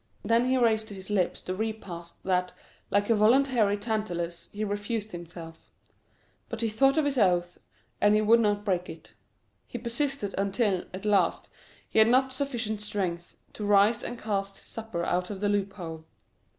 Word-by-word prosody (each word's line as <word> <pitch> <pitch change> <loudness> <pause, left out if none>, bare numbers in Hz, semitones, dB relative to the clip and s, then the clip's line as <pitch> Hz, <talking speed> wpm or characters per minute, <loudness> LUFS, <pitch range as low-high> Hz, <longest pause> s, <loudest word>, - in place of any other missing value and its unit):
Then 230 +3 +3
he 260 +1 +2
raised 220 -3 +2
to 205 - -7
his 190 +1 -7
lips 190 -4 0
the 185 - -4
repast 185 -5 -6
that, 180 -1 0 0.4
like 205 +2 +2
a - - +5
voluntary 225 -1 +4
Tantalus, 180 -6 -3
he 210 +1 -4
refused 205 +1 -3
himself; 170 -1 -10 0.8
but 230 -1 -4
he 225 - +1
thought 270 +7 +3
of 310 - +3
his 280 -3 0
oath, 175 -3 +2 0.4
and 205 0 +5
he 215 - +3
would 225 +2 +5
not 205 -2 +1
break 180 -3 0
it. 160 - -11 0.5
He - - -6
persisted 235 -2 -2
until, 200 -1 +1
at 190 +3 -7
last, 200 -5 +2 0.4
he - - +1
had 220 - +7
not 260 +2 +3
sufficient 240 -6 -2
strength 185 -5 -3 0.2
to 210 - -6
rise 205 +2 +4
and 240 - -5
cast 200 -3 -2
his - - -12
supper 220 -7 -4
out 180 0 0
of 200 -2 -5
the 205 0 0
loophole. 190 -6 -3
205 Hz, 175 wpm, -28 LUFS, 185-225 Hz, 0.8 s, had